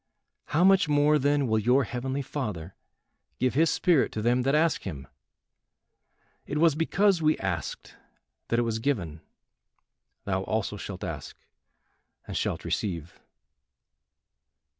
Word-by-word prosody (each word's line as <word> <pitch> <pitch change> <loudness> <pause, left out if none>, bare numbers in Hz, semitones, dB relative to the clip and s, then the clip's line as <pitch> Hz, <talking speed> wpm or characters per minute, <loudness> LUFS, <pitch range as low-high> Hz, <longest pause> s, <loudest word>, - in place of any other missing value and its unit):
How 155 +4 +1
much 190 -3 +5
more 150 +1 +4
then 145 0 +2
will 110 -2 +1
your 125 +5 +3
heavenly 130 +4 -3
Father 105 - -5 0.6
give 130 0 +1
his 160 +4 +3
spirit 175 -7 +2
to 110 - -3
them 120 +2 +2
that 135 +3 +1
ask 160 +1 +2
him. 70 -8 -7 1.4
It 145 - -3
was 165 0 +4
because 180 +4 +2
we 155 0 +3
asked 90 -4 -4 0.5
that 115 - 0
it 120 - +2
was 115 -1 -2
given. 95 - -2 1.0
Thou 95 -1 -1
also 105 +1 -2
shalt 100 -2 -7
ask - - -6 0.9
and - - -7
shalt - - -2
receive." 85 -5 -3
130 Hz, 130 wpm, -27 LUFS, 105-150 Hz, 1.4 s, much